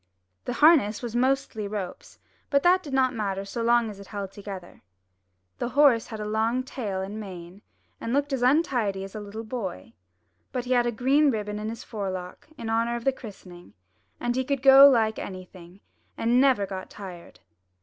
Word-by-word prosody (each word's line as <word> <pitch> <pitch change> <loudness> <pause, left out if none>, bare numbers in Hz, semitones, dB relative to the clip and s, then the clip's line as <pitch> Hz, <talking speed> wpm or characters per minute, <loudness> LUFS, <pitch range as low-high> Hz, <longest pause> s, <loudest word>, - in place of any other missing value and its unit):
The 245 - -2
harness 245 -5 +4
was 240 -1 -5
mostly 255 -4 0
ropes, 200 -3 -6 0.3
but 280 -1 +2
that 365 +1 +5
did 295 - -9
not 260 -1 +2
matter 200 -3 -3
so 235 +4 -5
long 235 0 +3
as 205 -2 -8
it 200 - -11
held 200 -2 -6
together. 195 -3 -9 0.8
The 240 - -2
horse 265 -5 +4
had 220 - -7
a 210 - -4
long 220 +4 0
tail 210 -8 -4
and 205 +3 -6
mane, 185 -2 -9 0.4
and 230 - -4
looked 285 +2 0
as 265 - -1
untidy 245 -8 +1
as 195 - -9
a 215 - -5
little 210 +2 -7
boy; 215 - -6 0.6
but 250 -1 -3
he 250 - -5
had 240 -1 +3
a - - +1
green 275 +6 +3
ribbon 210 -3 -3
in 215 +1 -4
his 230 - -7
forelock 185 -4 -6
in 230 - -6
honour 230 +1 0
of 235 - -5
the 270 - +3
christening, 185 -7 -12 0.4
and 240 0 -1
he 260 - +1
could 275 0 -2
go 275 +1 +10
like 220 -4 +2
anything, 185 0 -10 0.4
and 240 +2 +3
never 260 -7 +3
got 190 -1 -7
tired. 180 - -11
225 Hz, 190 wpm, -26 LUFS, 200-255 Hz, 0.8 s, go